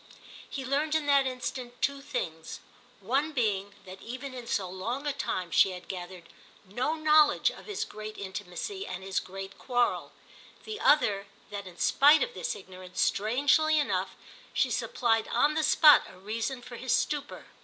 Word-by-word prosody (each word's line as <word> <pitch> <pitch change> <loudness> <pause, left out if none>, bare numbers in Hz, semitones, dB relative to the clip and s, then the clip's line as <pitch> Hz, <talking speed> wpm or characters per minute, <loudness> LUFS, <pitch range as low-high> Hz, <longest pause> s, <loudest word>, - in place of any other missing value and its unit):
He 270 -2 -5
learned 295 +4 0
in 315 -2 +1
that 280 -2 +4
instant 250 -1 -5
two 280 0 0
things: 160 - -5 0.4
one 275 +10 0
being 205 -6 -1
that 190 0 -11
even 255 +3 -7
in 245 -2 -8
so 195 -5 -1
long 225 +10 -4
a 290 - 0
time 185 -10 -3
she 190 - +4
had 180 - -10
gathered 180 -2 -7 0.4
no 250 +11 -1
knowledge 310 -1 +4
of - - -13
his 415 -2 -3
great 215 0 -8
intimacy 200 - -5
and 185 +1 -6
his 190 -1 -1
great 195 +1 -9
quarrel; 245 -2 0 0.5
the 430 -1 -6
other 210 - +3 0.2
that 200 -1 -6
in 175 -1 -12
spite 290 - +5
of 485 -1 -4
this - - -3
ignorance, 185 -1 -10
strangely 285 +8 +3
enough, 295 - 0 0.4
she - - +1
supplied 225 -2 +1
on 295 +1 +2
the 315 - +1
spot 305 -1 +7
a - - -15
reason 225 +6 -4
for 240 -1 -9
his 255 +1 -3
stupor. 290 +3 -1
245 Hz, 165 wpm, -29 LUFS, 195-290 Hz, 0.5 s, spot